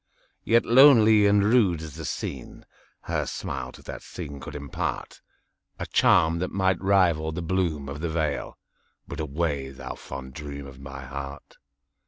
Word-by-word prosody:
Yet 115 +1 +3
lonely 115 -5 +7
and 100 0 +4
rude 105 -7 +3
as 80 -3 -8
the - - -7
scene, 65 -3 -6 0.4
Her - - -2
smile 65 -2 -5
to - - -14
that - - -7
scene 70 -1 -8
could 70 +2 -9
impartA 70 -2 -4 0.7
charm 80 +1 +4
that 90 - -2
might 95 -2 0
rival 90 -5 +3
the 85 +2 -4
bloom 85 -5 -1
of 70 +2 -6
the 85 - -2
vale,—But 75 -1 -5
away, 75 -2 -2
thou 65 - -7
fond 65 -1 -9
dream 70 0 -7
of 65 -1 -12
my 70 0 -9
heart! 70 +1 -8
80 Hz, 150 wpm, -26 LUFS, 70-95 Hz, 0.7 s, lonely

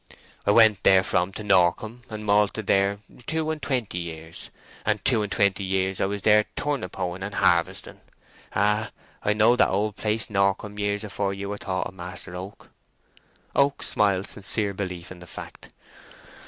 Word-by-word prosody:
I - - +4
went 110 -1 +6
therefrom 95 -1 +3
to 105 - -6
Norcombe, 105 +4 +2
and 110 -1 -6
malted 105 +1 +2
there 100 +1 +2 0.3
two 160 -1 0
and 155 -1 -5
twenty 120 -11 -1
years, 80 -1 -7 0.3
and 105 -2 -1
two 120 -5 +3
and 105 -1 -3
twenty 100 -3 +2
years 95 0 0
I - - +2
was 100 -1 -4
there 105 0 +5
turnip 140 -11 -2
hoeing 90 0 -3
and 100 +1 -5
harvesting. 85 -3 +1 0.5
Ah, 105 +2 +2 0.3
I 105 - +2
knowed 110 +3 +4
that - - +5
old 105 +2 0
place, 110 +1 0
Norcombe, 100 +1 0
years 105 0 -1
afore 100 -1 -2
you 100 0 -5
were 105 0 -4
thought 95 -1 -2
of, - - -7
Master 90 -1 -7
Oak" 95 +3 -9 0.8
(Oak 140 0 +2
smiled 100 -2 +1
sincere 100 0 +1
belief 90 -3 -5
in 90 - -10
the 90 - -12
fact). - - -9
100 Hz, 170 wpm, -25 LUFS, 95-105 Hz, 0.8 s, went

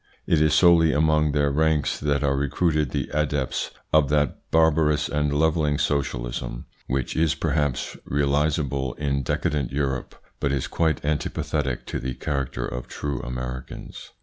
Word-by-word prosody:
It 80 -2 +2
is 75 0 +4
solely 80 -2 +6
among 75 0 +3
their 70 0 +2
ranks 80 0 +1
that 70 -1 0
are 70 -1 +2
recruited 75 +2 +1
the - - -3
adepts 75 -3 -1 0.2
of 75 -3 +5
that 75 -3 0
barbarous 75 -2 +3
and 75 0 0
levelling 75 0 +2
socialism, - - -2 0.2
which 65 0 -2
is 80 -1 +2
perhaps 75 -5 -1
realisable 70 -2 0
in 70 -1 -1
decadent 70 +1 -1
Europe, 70 -2 -2 0.2
but 70 - 0
is 70 -2 0
quite 80 -3 0
antipathetic 75 -3 -1
to - - -4
the 65 -1 -4
character 65 -3 -2
of 60 0 -5
true 70 -3 -4
Americans. 65 +1 -6
75 Hz, 145 wpm, -24 LUFS, 65-75 Hz, 0.2 s, solely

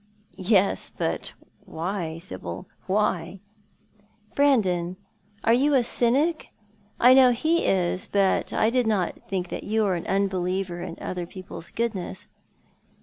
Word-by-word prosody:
" - - -30 0.2
Yes; 195 +1 +2
but - - -2 0.3
why, 170 -1 -4
Sibyl, 95 - -7 0.2
why? 190 -2 0 0.3
" 210 - -35
" 210 0 -34
Brandon, 185 -11 +2 0.5
are 230 - +4
you 280 +4 +3
a 255 - +4
cynic? 275 +8 +1 0.5
I 250 +2 +7
know 260 -1 +7
he 315 +8 +1
is, 185 -1 0
but 195 -1 +1
I 220 - +2
did 250 -2 +1
not 195 -5 -1
think 185 -2 -3
you 220 +1 0
were 195 -3 +1
an 170 - -4
unbeliever 185 -2 -1
in 175 -1 -6
other 180 -2 -4
people's 185 -2 -8
goodness." 210 -5 -3
195 Hz, 140 wpm, -25 LUFS, 180-235 Hz, 0.5 s, I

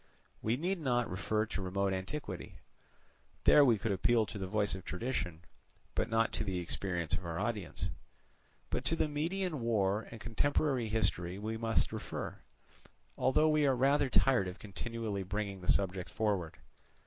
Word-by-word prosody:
We 115 +3 +1
need 180 +5 -1
not 120 -6 +1
refer 105 +4 0
to 105 - -4
remote 95 +1 0
antiquity: 95 +1 -5 0.9
there 150 - +8
we 120 -5 +5
could 110 +1 -1
appeal 110 +4 +3
to 105 - -7
the 95 - -3
voice 105 0 +1
of 95 -1 -5
tradition, 90 -6 -3 0.5
but - - 0
not 115 0 +2
to - - -1
the 95 -3 -2
experience 85 -2 -2
of 95 - 0
our 85 -1 -4
audience. 105 -4 -2 0.8
But - - -1
to 165 - +3
the 160 - +1
Median 165 +2 -1
War 105 -2 +1
and 115 - -9
contemporary 125 +2 +1
history 90 -5 +1
we 110 +2 -3
must 115 0 0
refer, - - -5 0.8
although 150 +4 +3
we 155 -1 +4
are 135 - +4
rather 135 +2 +3
tired 125 -7 +4
of 90 - -6
continually 105 0 -4
bringing 100 0 -3
this 90 - +4
subject 95 -2 -1
forward. 100 -7 -1
110 Hz, 160 wpm, -33 LUFS, 95-125 Hz, 0.9 s, there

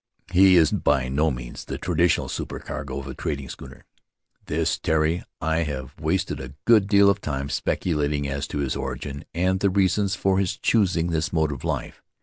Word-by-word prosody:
He 95 +1 +6
is 80 -3 +5
by 65 -1 +1
no 75 +4 +2
means 60 -3 -6
the - - -5
traditional 85 -1 +1
supercargo 65 0 -5
of 70 - -5
a - - -6
trading 70 -3 -4
schooner, - - -11 0.6
this - - 0
Tari; 80 +2 +1 0.2
I 80 +1 0
have 75 -5 -3
wasted - - -1
a 65 +1 -8
good 110 -4 +5
deal 100 -1 +5
of 100 0 +3
time 70 -1 -3
speculating 75 -2 -1
as 70 +1 -3
to - - -5
his 70 -2 -1
origin 70 +2 -5
and 95 +2 +1
the 100 - +2
reasons 100 +1 +2
for 95 0 +1
his 95 -3 -1
choosing 90 -6 +2
this 80 -1 -1
mode 80 -3 +1
of 70 -3 -7
life. - - -3
80 Hz, 180 wpm, -24 LUFS, 70-95 Hz, 0.6 s, He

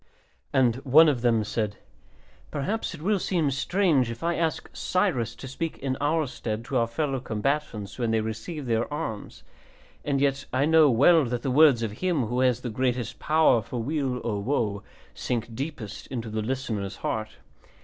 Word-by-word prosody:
And 125 -3 +3
one 145 +5 +6
of 135 -6 +1
them 115 -3 +3
said, 105 -1 -2 0.7
"Perhaps 185 +7 -2
it 155 - -11
will 205 +1 +2
seem 165 -6 0
strange 145 - +2
if 115 +6 -7
I 170 +1 +1
ask 165 -2 -1
Cyrus 140 - 0
to 135 - -9
speak 160 +5 -4
in 130 -1 -2
our 155 +2 +2
stead 115 -3 -5
to 130 - -1
our 115 -1 +2
fellow 135 +3 -1
combatants 110 -3 -3
when 120 -2 0
they 110 0 +2
receive 110 +8 -5
their 115 +2 0
arms, 145 -9 -5 0.6
and 140 -2 0
yet 135 -1 +1
I 130 +3 +2
know 160 -1 +6
well 145 +6 +5
that 120 0 -3
the 135 - 0
words 140 -4 +5
of 110 - -2
him 175 -9 +1
who 120 +3 -2
has 125 -2 +2
the 120 - -4
greatest 125 0 -1
power 155 -6 +4
for 125 +4 -6
weal 135 -2 -1
or 105 -4 -1
woe 105 -4 -1 0.3
sink 115 -1 -3
deepest 125 -4 -6
into 115 -4 -5
the 110 0 -2
listener's 110 -5 -3
heart. 110 -1 -3
130 Hz, 180 wpm, -26 LUFS, 115-150 Hz, 0.7 s, one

